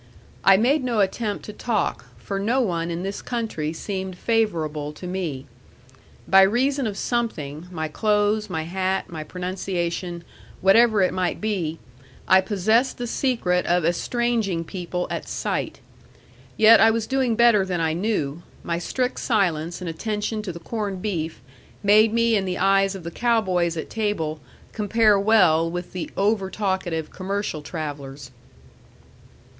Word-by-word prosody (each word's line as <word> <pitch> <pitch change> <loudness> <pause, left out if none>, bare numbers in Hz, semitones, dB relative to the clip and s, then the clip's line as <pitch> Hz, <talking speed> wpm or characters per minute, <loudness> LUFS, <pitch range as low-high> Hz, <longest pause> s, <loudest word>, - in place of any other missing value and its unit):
I 195 0 +7
made 260 +7 +2
no 240 -4 0
attempt 205 +2 -1
to 210 - -8
talk, 210 - -2
for 195 +11 -4
no 230 +6 +1
one 170 -8 -1
in 170 +1 -3
this 195 +1 -4
country 220 -11 -3
seemed 190 +2 -5
favorable 160 -11 0
to 165 - -10
me. 175 -7 -4 0.8
By 195 0 +7
reason 255 +6 +2
of 205 -2 -4
something, 175 - -3
my 160 -3 -3
clothes, 210 +4 +1
my 160 - -2
hat, 190 +2 -2
my 160 -2 -5
pronunciation, 180 0 -3 0.4
whatever 215 +1 +5
it 185 - +1
might 185 -1 -1
be, 185 -7 -2 0.5
I 190 0 +6
possessed 220 +6 +1
the 245 - -3
secret 230 -8 0
of 175 -1 +2
estranging 215 0 0
people 180 0 -4
at - - -4
sight. - - -3 0.8
Yet 220 +1 +8
I 225 - +7
was 225 0 0
doing 260 -2 +1
better 235 -3 +5
than 185 -2 -2
I 160 -1 +1
knew; 170 -5 -1 0.2
my 170 0 -2
strict 250 +8 -2
silence 175 -7 0
and 180 - -5
attention 210 +5 -3
to 205 -3 -5
the 170 - -9
corned 200 0 -4
beef 165 - -3 0.4
made 210 +2 +5
me 230 0 +2
in 195 -2 +1
the 180 -1 -2
eyes 195 +1 +3
of 190 - -8
the 170 - -6
cow 235 +4 +2
boys 175 -4 0
at 160 - -5
table 205 -9 -2 0.3
compare 215 -1 +3
well 180 -6 +4
with 175 +1 -6
the 180 -2 -4
over 200 -1 +1
talkative 190 -6 -2
commercial 195 -4 -3
travellers. 145 -4 -6
190 Hz, 150 wpm, -23 LUFS, 170-220 Hz, 0.8 s, Yet